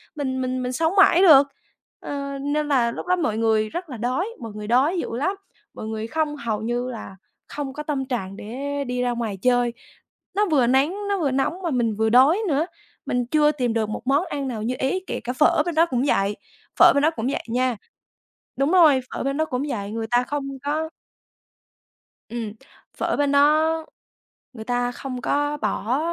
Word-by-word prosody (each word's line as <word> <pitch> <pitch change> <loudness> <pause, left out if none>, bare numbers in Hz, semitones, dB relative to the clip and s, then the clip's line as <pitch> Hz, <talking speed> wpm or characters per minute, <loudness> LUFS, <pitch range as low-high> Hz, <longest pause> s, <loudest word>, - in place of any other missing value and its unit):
mình 260 -3 -2
mình 255 0 -2
mình 250 - -2
sống 320 +7 0
mãi 390 -2 +6
được. 290 -7 +8 0.5
Ờ, 280 -1 -5
nên 295 +2 -1
là 250 -5 +2
lúc - - -7
đó 365 - +3
mọi 300 -12 -1
người 220 -1 +2
rất 345 +6 -6
là 255 - -6
đói, 255 - -1
mọi 230 -2 -7
người 210 0 -6
đói 275 - +3
dữ 230 - -4
lắm, 370 +10 0 0.4
mọi - - -7
người 220 0 -4
không 305 +2 -1
hầu 230 -7 -3
như 240 +2 -2
là 225 -5 -8 0.3
không 280 -2 -5
có 300 - -6
tâm 285 -3 -2
trạng 200 -7 -4
để 280 +7 -4
đi 250 0 -2
ra 250 0 +1
ngoài 230 -4 -3
chơi. 245 -1 +2 0.6
Nó 415 +1 +3
vừa 265 -6 +4
nắng, 270 +8 +2
nó 400 -1 0
vừa 290 -5 +1
nóng 275 +7 -1
mà 340 - 0
mình 235 -4 0
vừa 220 +1 +1
đói 265 - +5
nữa, 305 0 +1 0.4
mình 245 0 0
chưa 300 +4 +3
tìm 250 -6 -1
được 220 -2 0
một 215 - -4
món 285 +6 +3
ăn 280 -4 -3
nào 230 -4 -4
như 245 +3 -1
ý, 270 +8 0
kể - - -3
cả 250 - -3
phở 300 +2 +3
bên 345 -2 -3
đó 325 +1 +5
cũng 255 -6 -1
vậy, 200 -5 +1 0.4
phở - - +9
bên 280 - +2
đó 310 - +5
cũng 225 +1 -2
vậy 275 - -2
nha. 250 0 0 0.8
Đúng 275 +4 +1
rồi, 315 -8 +6
phở - - -3
bên 275 +1 -1
đó 315 - +1
cũng 255 -3 -2
vậy, 205 -7 -4
người 225 +1 -3
ta 245 0 +3
không 280 +1 -3 0.2
có 310 +2 -1 1.4
Ừm, 225 -2 -4 0.4
phở - - 0
bên 285 -1 +1
đó 310 +3 +3 0.7
người 220 -3 -8
ta 245 0 0
không 255 0 -6
có 290 +2 0
bỏ 230 +2 -1
265 Hz, 205 wpm, -23 LUFS, 235-295 Hz, 1.4 s, phở